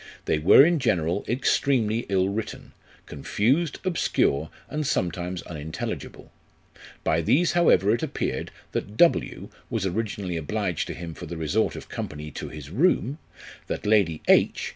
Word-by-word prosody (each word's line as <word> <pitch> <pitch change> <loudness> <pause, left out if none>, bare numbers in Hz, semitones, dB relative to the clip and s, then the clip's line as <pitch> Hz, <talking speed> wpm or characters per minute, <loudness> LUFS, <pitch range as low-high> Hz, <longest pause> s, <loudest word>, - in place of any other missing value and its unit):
They 75 - +1
were 90 - +8
in 170 -1 +2
general 90 - 0
extremely 120 -2 +1
ill 95 -1 +2
written, 105 +2 -5 0.3
confused, 130 - 0
obscure, 80 - +1 0.2
and 150 -1 -3
sometimes 90 - -2
unintelligible. 80 -1 -6 0.7
By 80 +1 +2
these 160 - +3
however 140 - +4
it 120 - -1
appeared, - - -3 0.2
that 105 +2 -4
W 170 - +2 0.2
was - - -1
originally 95 -2 -2
obliged 90 +1 -2
to - - -5
him 85 -1 -7
for - - -9
the 85 - -6
resort 80 +8 0
of - - -9
company 75 0 -6
to - - -6
his 75 -1 -9
room; 145 - +1 0.5
that - - -4
Lady 100 -7 +2
H. - - +3
100 Hz, 140 wpm, -25 LUFS, 80-125 Hz, 0.7 s, were